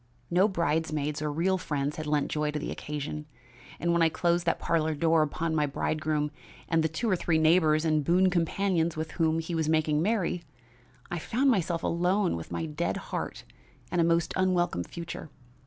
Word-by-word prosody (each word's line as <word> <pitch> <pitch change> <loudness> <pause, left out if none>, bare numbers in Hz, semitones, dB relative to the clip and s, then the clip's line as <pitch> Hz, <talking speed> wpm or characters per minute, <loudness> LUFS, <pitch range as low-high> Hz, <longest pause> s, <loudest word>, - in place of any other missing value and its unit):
No 185 +4 +5
bridesmaids 155 -5 -1
or 150 -1 -1
real 185 +5 +1
friends 145 -4 -2
had 155 -1 -4
lent 150 -1 0
joy 150 0 0
to 150 - -2
the 150 - -4
occasion; 150 0 -5 0.5
and 170 0 +1
when 170 - +2
I 165 - +5
closed 175 +1 0
that - - +2
parlor 160 -2 0
door 160 +1 +3
upon 160 +2 -1
my 150 -2 +2
bridegroom 150 +1 -1 0.4
and 165 0 +2
the 160 - +1
two 195 +10 -2
or 195 - +3
three 170 -2 +1
neighbors 160 -1 +4
and 155 -2 +2
boon 180 +4 +3
companions 170 -1 +1
with 160 0 -3
whom 160 -2 +1
he 165 +1 -3
was 160 -2 0
making 155 -1 +2
merry, 180 -3 0 0.7
I 175 - -2
found 260 - +2
myself 175 -6 0
alone 180 +3 +1
with 85 0 -7
my 85 -1 -2
dead 75 -1 -2 0.2
heart - - -3 0.5
and 175 - +2
a - - +4
most 170 0 +2
unwelcome 180 - +1
future. 170 -2 -7
160 Hz, 190 wpm, -28 LUFS, 150-175 Hz, 0.7 s, No